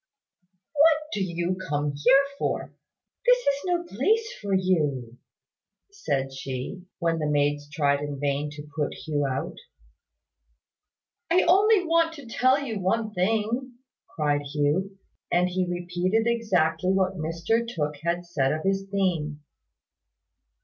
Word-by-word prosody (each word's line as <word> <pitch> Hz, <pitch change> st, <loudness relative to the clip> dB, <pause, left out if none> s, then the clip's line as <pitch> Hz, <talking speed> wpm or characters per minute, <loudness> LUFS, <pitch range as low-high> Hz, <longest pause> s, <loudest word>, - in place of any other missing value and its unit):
"What 310 Hz, +1 st, +6 dB, 0.2 s
do 200 Hz, -, 0 dB
you 175 Hz, 0 st, -1 dB
come 145 Hz, 0 st, 0 dB
here 260 Hz, -, +5 dB, 0.2 s
for? -, -, -2 dB, 0.5 s
This -, -, +6 dB
is 280 Hz, -, +1 dB
no 350 Hz, -1 st, 0 dB
place 430 Hz, -, 0 dB
for 200 Hz, -1 st, -4 dB
you," 150 Hz, -11 st, 0 dB, 0.7 s
said 135 Hz, -, -2 dB
she, 135 Hz, +8 st, -6 dB
when 165 Hz, -2 st, 0 dB
the 150 Hz, -1 st, -1 dB
maids 145 Hz, 0 st, +1 dB
tried 145 Hz, -2 st, +1 dB
in 145 Hz, -1 st, -5 dB
vain 145 Hz, +1 st, -1 dB
to 150 Hz, 0 st, -9 dB
put 150 Hz, -3 st, -1 dB
Hugh 145 Hz, -3 st, -1 dB
out. 135 Hz, 0 st, -3 dB, 1.7 s
"I 355 Hz, +2 st, +4 dB
only 390 Hz, +2 st, +4 dB
want 330 Hz, 0 st, +2 dB
to 285 Hz, -3 st, -11 dB
tell 255 Hz, +4 st, +3 dB
you 220 Hz, -5 st, -3 dB
one 215 Hz, +3 st, 0 dB
thing," 225 Hz, +6 st, 0 dB, 0.4 s
cried 145 Hz, -2 st, +1 dB
Hugh; 150 Hz, +7 st, -1 dB, 0.3 s
and 180 Hz, +1 st, +3 dB
he 180 Hz, 0 st, -1 dB
repeated 180 Hz, +5 st, 0 dB
exactly 190 Hz, -7 st, +1 dB
what 190 Hz, 0 st, +2 dB
Mr 165 Hz, +7 st, 0 dB
Tooke 150 Hz, -10 st, -3 dB
had 170 Hz, +2 st, -1 dB
said 140 Hz, -6 st, 0 dB
of 155 Hz, +1 st, -2 dB
his 195 Hz, 0 st, 0 dB
theme. 165 Hz, -7 st, -1 dB
180 Hz, 135 wpm, -26 LUFS, 150-230 Hz, 1.7 s, What